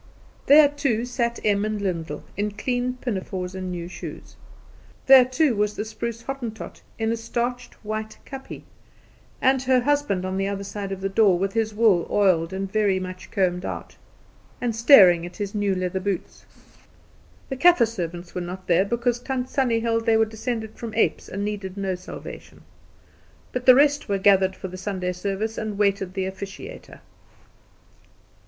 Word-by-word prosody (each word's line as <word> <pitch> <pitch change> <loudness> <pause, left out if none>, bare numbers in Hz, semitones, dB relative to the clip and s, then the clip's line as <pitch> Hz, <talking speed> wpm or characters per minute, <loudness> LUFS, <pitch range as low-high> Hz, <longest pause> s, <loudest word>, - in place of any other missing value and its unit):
There 295 +1 +8
too 275 -6 -1
sat 235 -1 -2
Em 205 -1 +2
and 215 0 -2
Lyndall, 165 -6 -3
in 205 +1 -1
clean 245 +4 -2
pinafores 190 -5 -4
and 185 -1 -5
new 175 -1 -5
shoes. 180 - -9 0.7
There 265 -2 +8
too 255 0 +1
was 210 0 0
the 210 - -3
spruce 230 +1 -5
Hottentot 240 -5 -6 0.2
in 225 0 0
a - - +1
starched 240 +2 -3
white 215 0 -4
kapje, 270 -1 -9 0.8
and 265 0 +4
her 260 -1 +3
husband 285 -9 0
on 185 0 -2
the 195 0 0
other 200 0 -3
side 200 0 -5
of 195 -1 -5
the 195 - 0
door, 195 -2 +4
with 195 +2 -1
his 220 -1 -1
wool 210 -6 +3
oiled 185 -5 +2
and 195 0 -4
very 205 -3 +2
much 185 0 -7
combed 180 -2 0
out, - - -6 0.6
and 235 -2 -1
staring 200 -8 +7
at 175 - -8
his 205 -1 -4
new 205 -2 0
leather 185 0 -2
boots. 195 -1 -4 1.0
The 265 - -3
Kaffer 310 -2 +5
servants 175 -5 -6
were 180 - -3
not 180 +1 -7
there 180 +2 +3
because 235 +2 0
Tant 255 0 -3
Sannie 240 -4 +1
held 230 0 0
they 225 -1 +5
were 220 - +4
descended 220 0 -4
from 230 -2 -7
apes, 225 - +1
and 200 +2 -3
needed 200 -2 -5
no 195 -1 -1
salvation. 180 0 -10 0.9
But 250 0 -4
the 255 - +10
rest 290 -2 +3
were 200 - +1
gathered 190 -1 +4
for 190 - -6
the 185 0 -8
Sunday 185 -1 -3
service, 200 +4 -3
and 215 -2 -4
waited 200 -2 0
the 190 -1 -1
officiator. 200 - -8
210 Hz, 170 wpm, -24 LUFS, 190-235 Hz, 1.0 s, the